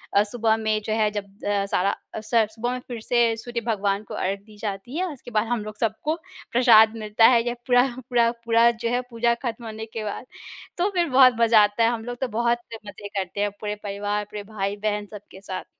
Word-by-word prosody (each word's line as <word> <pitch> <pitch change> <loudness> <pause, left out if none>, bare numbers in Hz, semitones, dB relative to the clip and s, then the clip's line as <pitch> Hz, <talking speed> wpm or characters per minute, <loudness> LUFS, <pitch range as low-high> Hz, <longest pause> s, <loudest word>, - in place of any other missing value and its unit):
अ, 200 - +6
सुबह 220 +1 +1
में 215 -1 0
जो 215 - -1
है 215 -1 +2
जब 205 -1 -4 0.2
अ, 205 -1 +1
सारा 195 -1 +1 0.3
अ, - - -3
स 225 0 +3
सुबह 235 +2 -3
में 250 - -3
फिर 240 -2 -5
से 235 0 +2
सूर्य 235 +1 -4
भगवान 200 -2 0
को - - -10
अर्घ 195 +2 -2
दी 210 +1 -17
जाती 205 +6 -5
है। 370 - 0
उसके 245 -3 -12
बाद 215 +1 +1
हम 235 -2 -1
लोग 215 0 -8
सबको 230 +8 -1 0.4
प्रसाद 225 -3 +6
मिलता 215 +1 +3
है, 240 -2 +5
या 240 - 0
पूरा 245 0 +5 0.2
पूरा 235 -2 +4 0.2
पूरा 230 0 +5
जो 230 0 -3
है 245 +1 +1
पूजा 235 0 +1
खत्म 235 0 -4
होने 220 0 -6
के 220 0 -6
बाद। 210 +4 -5 0.5
तो 365 +3 +2
फिर 345 -2 +2
बहुत 255 -1 +7
मज़ा 225 -2 +6
आता 205 +2 +1
है, 225 - +5
हम 235 -2 -3
लोग 245 0 -5
तो 260 - +1
बहुत 235 +1 +1 0.3
मज़े 205 0 -8
करते 200 0 -4
हैं 205 0 +1
पूरे 210 -1 -3
परिवार, 205 +1 -2
पूरे 210 0 -7
भाई-बहन, 205 0 -2
सबके 195 -2 -12
साथ। 190 -2 -6
220 Hz, 225 wpm, -24 LUFS, 205-235 Hz, 0.5 s, बहुत